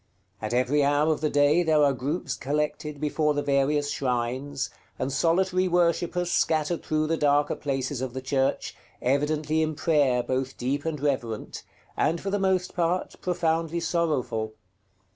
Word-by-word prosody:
At 110 - -3
every 130 +4 +2
hour 145 +2 +3
of 150 - -6
the 155 - +1
day 145 +4 +4
there 155 -3 +3
are 140 -1 +4
groups 140 +3 -3
collected 150 +1 -2
before 150 0 +1
the 145 - 0
various 145 +1 +1
shrines, 130 +2 -2 0.3
and 135 - -2
solitary 185 +4 +2
worshippers 175 0 +1
scattered 160 +1 +1
through 155 0 0
the 165 +1 0
darker 145 0 +2
places 135 -2 -3
of 130 -2 -3
the - - -2
church, 135 0 0 0.2
evidently 150 +4 +1
in 155 -1 -1
prayer 145 -6 +2
both 130 +1 -2
deep 140 +4 -2
and 160 -2 -2
reverent, 130 -6 -2 0.3
and, 165 +2 +1
for 195 - -4
the 205 - 0
most 190 -1 +1
part, 175 +1 0
profoundly 165 -2 0
sorrowful. 145 -10 -1
150 Hz, 155 wpm, -26 LUFS, 135-165 Hz, 0.3 s, day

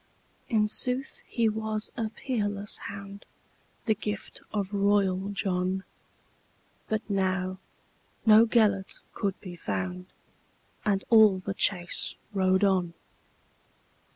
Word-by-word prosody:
In 215 -3 +3
sooth 250 +5 -2
he 235 -2 +1
was 215 0 -2
a 225 -2 -2
peerless 205 -4 -2
hound, 200 0 -8 0.6
The 220 - +4
gift 210 0 -5
of 205 -2 -2
royal 200 -1 +2
John; 190 -1 -1 1.1
But 220 0 -1
now 190 -2 0 0.7
no 220 +1 +8
Gêlert 210 -4 +2
could 200 -2 -2
be 180 -3 -8
found, 95 - -3 0.8
And 195 -2 +1
all 215 -4 +7
the 190 +1 -4
chase 180 -2 +1 0.2
rode 190 0 +3
on. 185 -4 +2
200 Hz, 105 wpm, -28 LUFS, 190-215 Hz, 1.1 s, no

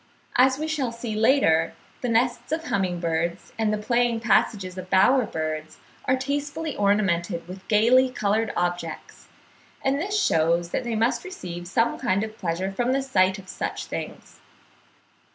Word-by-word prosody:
As 260 +1 +5
we 310 +2 -3
shall 290 -6 -1
see 230 -1 -5
later, 215 - +3 0.3
the 245 - -1
nests 240 +4 +1
of 320 +1 -1
humming 190 - -1
birds, 170 +1 -2
and 220 -2 0
the 215 - 0
playing 235 +2 +1
passages 205 -4 +1
of 185 0 -8
bower 215 +6 +4
birds 155 0 -4 0.3
are 260 - +3
tastefully 285 +3 -3
ornamented 190 -4 +1
with 185 +1 -10
gaily 240 +5 +5
coloured 220 -2 0
objects; 175 -2 -3 0.6
and 270 +1 +2
this 405 +5 0
shews 170 - +2
that 255 - -2
they 235 -2 -2
must 235 +2 +1
receive 175 - -7
some 230 +5 +1
kind 190 +3 +1
of 220 0 -7
pleasure 180 +2 -2
from 245 +5 0
the 270 0 0
sight 190 -7 +2
of 190 -1 -12
such - - -4
things. - - -7
215 Hz, 160 wpm, -25 LUFS, 180-255 Hz, 0.6 s, As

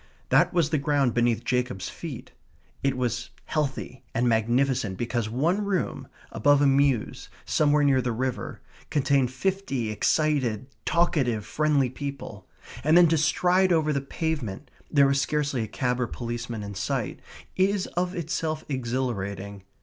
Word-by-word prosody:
That - - +4
was 170 -4 +1
the 155 - +2
ground 140 -4 +1
beneath 120 -1 +1
Jacob's 125 -7 -1
feet. 155 -8 -8 0.5
It 135 -1 0
was 125 -1 -2 0.2
healthy 135 -4 -3
and 120 +2 +2
magnificent 120 -2 +1
because 120 -2 -2
one 165 - +1
room, 195 -3 -2 0.2
above 145 +6 +4
a 145 - +4
mews, 135 -4 +1 0.2
somewhere 150 -1 +3
near 135 -2 +4
the 125 0 -1
river, 130 +2 -3 0.3
contained 140 -3 +2
fifty 135 - -2
excited, 130 -2 +1 0.2
talkative, 135 -11 +1
friendly 145 -1 +1
people. 140 -8 -7 0.4
And 155 +4 +5
then 175 -2 +7
to 165 - +3
stride 180 +4 +3
over 155 -3 +2
the 140 - 0
pavement 140 - -4 0.2
(there 140 -2 +5
was 140 0 +2
scarcely 145 -4 0
a 110 - -3
cab 125 +2 -1
or 120 - 0
policeman 120 -2 -5
in 100 0 -6
sight) 95 - -2 0.4
is 190 +1 +2
of 180 +1 -1
itself 160 -2 -2
exhilarating. 115 -7 -3
135 Hz, 145 wpm, -26 LUFS, 120-155 Hz, 0.5 s, then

